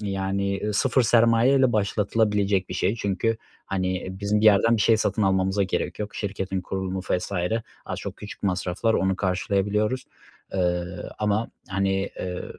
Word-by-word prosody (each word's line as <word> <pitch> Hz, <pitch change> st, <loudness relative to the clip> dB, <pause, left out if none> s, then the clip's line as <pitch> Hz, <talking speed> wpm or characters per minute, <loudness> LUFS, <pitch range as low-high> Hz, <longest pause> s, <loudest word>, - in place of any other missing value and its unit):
yani, 100 Hz, -1 st, -1 dB
ııı, 105 Hz, -, -1 dB
0 130 Hz, +4 st, +3 dB
sermaye 115 Hz, +2 st, +4 dB
ile 130 Hz, -2 st, +4 dB
başlatılabilecek 105 Hz, -2 st, +1 dB
bir -, -, -5 dB
şey 95 Hz, +4 st, +1 dB
çünkü, 110 Hz, +2 st, 0 dB, 0.3 s
hani, 95 Hz, -1 st, -2 dB
bizim 105 Hz, +1 st, +1 dB
bir -, -, 0 dB
yerden 110 Hz, +3 st, +5 dB
bir 105 Hz, -, +1 dB
şey 115 Hz, -, +5 dB
satın 110 Hz, 0 st, 0 dB
almamıza 95 Hz, +1 st, +2 dB
gerek 90 Hz, -2 st, -2 dB
yok. 105 Hz, 0 st, -5 dB
Şirketin 95 Hz, -2 st, -3 dB
kurulumu 95 Hz, +1 st, -3 dB
vs. 90 Hz, +2 st, -1 dB, 0.5 s
az -, -, -4 dB
çok -, -, -6 dB
küçük 105 Hz, -, -10 dB
masraflar 95 Hz, +3 st, 0 dB
onu 95 Hz, 0 st, +1 dB
karşılayabiliyoruz. 100 Hz, +5 st, 0 dB, 0.5 s
Iıı, 90 Hz, -1 st, -1 dB
ama, 105 Hz, +2 st, 0 dB, 0.2 s
hani, 95 Hz, 0 st, 0 dB
eee, 90 Hz, -1 st, -4 dB
100 Hz, 155 wpm, -25 LUFS, 95-105 Hz, 0.5 s, yerden